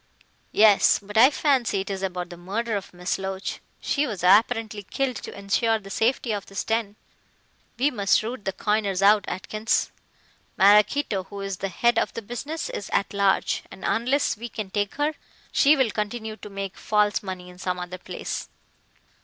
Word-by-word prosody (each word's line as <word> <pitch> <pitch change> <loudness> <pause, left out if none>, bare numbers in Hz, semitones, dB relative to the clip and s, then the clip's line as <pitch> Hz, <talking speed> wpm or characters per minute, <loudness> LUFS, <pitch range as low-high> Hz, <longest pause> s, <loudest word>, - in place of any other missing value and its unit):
"Yes. 210 -2 +6
But 205 +1 -11
I 240 +4 +8
fancy 265 -9 +1
it 195 - -5
is 190 -1 -4
about 180 -2 -3
the - - -7
murder 210 +6 -3
of 200 - -5
Miss 180 +1 -3
Loach. 190 0 -4 0.2
She 295 +1 0
was 205 -7 -5
apparently 215 +2 +3
killed 255 +4 -2
to - - -8
ensure 220 +3 +1
the 195 -2 -11
safety 235 +2 +1
of 205 -2 -3
this 195 - -4
den. 225 -2 -1 0.8
We 280 +4 +2
must 200 -3 +2
root 230 -1 -6
the 195 - 0
coiners 200 -2 0
out, 205 0 +5
Atkins. 215 +4 -1 0.7
Maraquito, 205 +1 +4
who 200 0 -8
is 195 -1 -4
the 195 - -3
head 235 +5 +2
of - - 0
the 230 - -5
business, 280 +9 -5
is 200 - -6
at 200 - 0
large, 200 -1 +2
and - - -12
unless 255 +5 +1
we 235 +3 -7
can 210 -3 -6
take 205 -1 -1
her, 295 +2 0 0.4
she 295 +2 +5
will 260 -5 +2
continue 215 +1 -3
to 210 - -10
make 195 -1 -6
false 210 -1 +1
money 185 -2 -6
in 180 0 -13
some 180 -1 -2
other 180 +1 -6
place. - - -5
205 Hz, 180 wpm, -25 LUFS, 195-230 Hz, 0.8 s, I